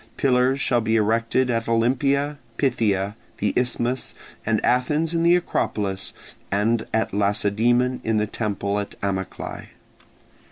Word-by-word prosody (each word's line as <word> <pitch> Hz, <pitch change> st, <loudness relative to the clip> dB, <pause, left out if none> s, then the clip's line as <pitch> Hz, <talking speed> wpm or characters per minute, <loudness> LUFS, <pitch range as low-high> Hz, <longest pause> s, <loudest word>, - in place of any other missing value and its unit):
Pillars 130 Hz, 0 st, +3 dB
shall 120 Hz, -2 st, +2 dB
be 110 Hz, 0 st, +1 dB
erected 115 Hz, +4 st, +2 dB
at 115 Hz, -1 st, -1 dB
Olympia, 140 Hz, +5 st, +1 dB, 0.2 s
Pythia, 105 Hz, -7 st, +1 dB, 0.2 s
the -, -, 0 dB
Isthmus, 125 Hz, 0 st, -1 dB, 0.3 s
at 110 Hz, -1 st, +2 dB
Athens 150 Hz, +7 st, +1 dB
in 165 Hz, -, +1 dB
the 170 Hz, +1 st, +5 dB
Acropolis, 100 Hz, -, -1 dB, 0.4 s
and 110 Hz, +3 st, +1 dB
at 110 Hz, -3 st, 0 dB
Lacedaemon 110 Hz, +5 st, +1 dB
in 110 Hz, -1 st, +1 dB
the 105 Hz, -, +2 dB
temple 100 Hz, -2 st, -2 dB
at 100 Hz, -, -5 dB
Amyclae. 95 Hz, -2 st, -4 dB
115 Hz, 125 wpm, -23 LUFS, 105-130 Hz, 0.4 s, the